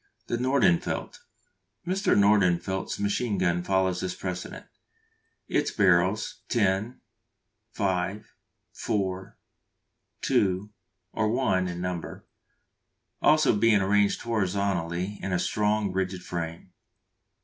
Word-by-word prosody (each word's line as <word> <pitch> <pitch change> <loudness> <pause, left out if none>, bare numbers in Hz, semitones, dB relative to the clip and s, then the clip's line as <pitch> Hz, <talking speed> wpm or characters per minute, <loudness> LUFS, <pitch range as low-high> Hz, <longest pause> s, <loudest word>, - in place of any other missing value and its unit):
The 120 - -2
Nordenfelt. 125 -9 +1 0.7
Mr. 190 +3 +1
Nordenfelt's 95 -2 +2
machine 100 +1 0
gun 85 -1 +1
follows 95 0 0
this 90 -1 -3
precedent; 90 -1 -6 0.8
its - - +1
barrels 95 +1 +2
10, 105 +1 0 0.7
5, 95 +2 -2 0.4
4, 95 -2 -3 0.9
2, 95 +1 +1 0.4
or 110 - 0
1 100 -7 +1
in 90 0 -5
number 90 -2 -5 1.0
also 155 -6 +4
being 110 0 +4
arranged 100 +1 +2
horizontally 100 -3 -1
in 95 - -3
a 90 - +2
strong, 105 +2 0
rigid 95 -1 -2
frame. 85 +1 -5
95 Hz, 95 wpm, -27 LUFS, 90-105 Hz, 1.0 s, also